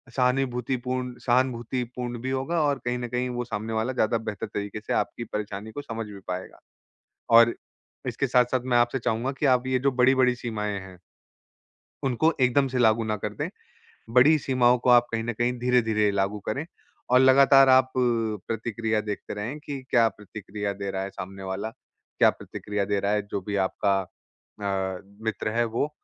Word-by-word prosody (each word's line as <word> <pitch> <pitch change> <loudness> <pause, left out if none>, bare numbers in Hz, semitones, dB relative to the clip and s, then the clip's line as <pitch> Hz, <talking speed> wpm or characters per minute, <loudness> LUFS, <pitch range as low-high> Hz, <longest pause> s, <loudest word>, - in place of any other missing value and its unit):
सहानिभूतिपूर्ण 125 -1 0
सहानुभूतिपूर्ण 125 -1 -1
भी 130 - -3
होगा 135 +6 0
और 145 -2 +1
कहीं 120 0 0
न 120 - -4
कहीं 125 +1 -1
वो 120 0 -3
सामने 115 -1 -4
वाला 110 +4 -1
ज़्यादा 115 -2 +1
बेहतर 110 -2 -5
तरीक़े 105 +1 -5
से - - 0
आपकी 120 - -1
परेशानी 105 -1 -5
को 145 - -6
समझ 115 -4 -5
भी 100 -1 -10
पाएगा। 90 0 -6 0.8
और 115 0 +7 0.5
इसके 125 +3 -1
साथ-साथ 125 0 +2
मैं 125 -1 +1
आपसे 120 +2 +2
चाहूँगा 120 +1 -1
कि 150 - +2
आप 130 -1 +3
ये 130 0 +1
जो 140 +2 +2
बड़ी-बड़ी 130 0 +4
सीमाएँ 105 -4 -3
हैं। 95 -1 -12 1.1
उनको 135 +5 +2
एकदम 130 +2 +3
से 130 0 -3
लागू 115 -1 +4
ना 110 -1 -1
कर - - -4
दें। - - -3 0.6
बड़ी 135 +6 +6
सीमाओं 125 -3 +3
को 125 - +1
आप 120 -1 +6
कहीं 115 0 -1
न 120 +1 -2
कहीं 120 +2 0
धीरे-धीरे 115 -4 +2
लागू 100 +1 -1
करें 135 +8 -2 0.4
और 125 +1 +6
लगातार 135 +1 +7
आप 130 0 +5
प्रतिक्रिया 115 -1 -1
देखते 105 -1 -5
रहें 110 +8 -5
कि 145 -2 -6
क्या 115 -2 +5
प्रतिक्रिया 105 -1 -6
दे 100 0 -5
रहा 95 - -3
है 95 - -4
सामने 95 0 -8
वाला, 95 +3 -3
क्या - - -1
प्रतिक्रिया 105 -1 -4
दे 100 0 0
रहा 100 +1 0
है 105 0 +2
जो 100 - -2
भी 100 +2 -4
आपका 100 +1 0
अ, 95 0 -6 0.3
मित्र 110 -1 -1
है 120 +2 +1
वो। 115 +6 -1
120 Hz, 175 wpm, -26 LUFS, 105-125 Hz, 1.1 s, और